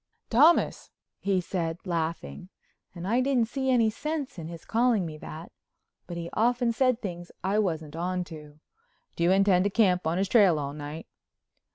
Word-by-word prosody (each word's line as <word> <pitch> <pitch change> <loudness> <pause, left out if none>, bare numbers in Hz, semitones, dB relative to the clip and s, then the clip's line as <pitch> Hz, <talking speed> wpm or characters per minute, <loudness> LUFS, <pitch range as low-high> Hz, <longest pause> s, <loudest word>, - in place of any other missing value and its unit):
"Thomas!" 300 +9 +4 0.3
he 195 -2 +1
said, 170 -2 -3
laughing, 170 +1 -3 0.5
and 175 +1 -6
I 235 +5 +2
didn't 255 -4 +1
see 265 +1 -2
any 230 -4 +3
sense 285 - -4
in 160 - -6
his 165 -1 -9
calling 230 -4 +2
me 155 -2 -6
that, 160 +3 -9 0.6
but 175 -1 -6
he 170 0 -4
often 240 +2 +2
said 255 0 +2
things 175 -3 -6
I 195 +3 +1
wasn't 160 -6 -2
on 180 +2 -2
to. 150 -3 -12 0.6
"Do 170 - -1
you - - +4
intend 190 -1 +4
to - - +3
camp 185 -5 +2
on 165 +2 0
his 195 +1 +1
trail 195 -7 +5
all 140 -1 -3
night?" 150 +2 -7
185 Hz, 175 wpm, -27 LUFS, 165-230 Hz, 0.6 s, trail